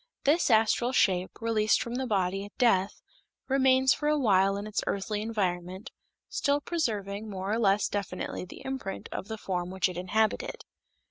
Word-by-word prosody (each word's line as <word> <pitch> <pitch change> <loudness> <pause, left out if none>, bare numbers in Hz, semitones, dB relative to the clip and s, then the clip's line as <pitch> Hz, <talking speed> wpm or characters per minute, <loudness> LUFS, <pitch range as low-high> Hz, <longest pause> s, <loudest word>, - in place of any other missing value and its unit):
This 300 +3 +3
astral 225 +2 +3
shape, 185 -6 +2
released 220 -2 +2
from 235 - -4
the 260 +1 -2
body 195 -2 0
at 205 - -15
death, 200 -5 +2 0.4
remains 265 -1 +4
for 295 - -3
a 300 0 +3
while 195 -6 +3
in 200 - -5
its 215 -1 -2
earthly 205 +1 -2
environment, 185 -3 -3 0.4
still 285 0 +1
preserving 215 - -2
more 190 0 -4
or 225 - +1
less 200 -2 +3
definitely 200 -3 -4
the 180 - -11
imprint 265 -7 -5
of 190 - -5
the 220 - -5
form 180 -3 -3
which 190 0 +1
it 180 -2 -7
inhabited. 215 +5 -1
210 Hz, 170 wpm, -28 LUFS, 190-240 Hz, 0.4 s, remains